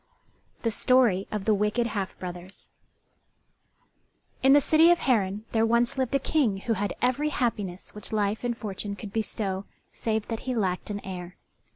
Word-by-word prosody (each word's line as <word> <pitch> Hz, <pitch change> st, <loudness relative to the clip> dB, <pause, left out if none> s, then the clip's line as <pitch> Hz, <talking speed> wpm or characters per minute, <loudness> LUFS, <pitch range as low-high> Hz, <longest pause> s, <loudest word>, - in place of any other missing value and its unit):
THE 230 Hz, -, +2 dB
STORY 225 Hz, -4 st, +3 dB
OF 210 Hz, -2 st, -3 dB
THE 220 Hz, -, +4 dB
WICKED 210 Hz, +4 st, +1 dB
HALF 205 Hz, -4 st, -3 dB
BROTHERS 180 Hz, +1 st, -8 dB, 1.7 s
In 270 Hz, +1 st, +6 dB
the 290 Hz, -, +8 dB
city 315 Hz, +4 st, +5 dB
of 345 Hz, -, +6 dB
Harran 210 Hz, -, 0 dB
there 225 Hz, -1 st, +2 dB
once 235 Hz, +1 st, +2 dB
lived 265 Hz, 0 st, 0 dB
a -, -, +4 dB
King 260 Hz, -8 st, +1 dB
who 230 Hz, -, 0 dB
had 205 Hz, -1 st, -2 dB
every 255 Hz, +5 st, +2 dB
happiness 205 Hz, -9 st, -2 dB
which 210 Hz, -1 st, -7 dB
life 210 Hz, 0 st, 0 dB
and 240 Hz, -1 st, -1 dB
fortune 205 Hz, -2 st, -4 dB
could 200 Hz, -1 st, -9 dB
bestow 200 Hz, -3 st, -2 dB, 0.3 s
save 220 Hz, -1 st, -2 dB
that 225 Hz, -1 st, -2 dB
he 255 Hz, -, 0 dB
lacked 190 Hz, -4 st, -1 dB
an 205 Hz, -1 st, -4 dB
heir. 180 Hz, -1 st, -7 dB
215 Hz, 170 wpm, -27 LUFS, 195-240 Hz, 1.7 s, the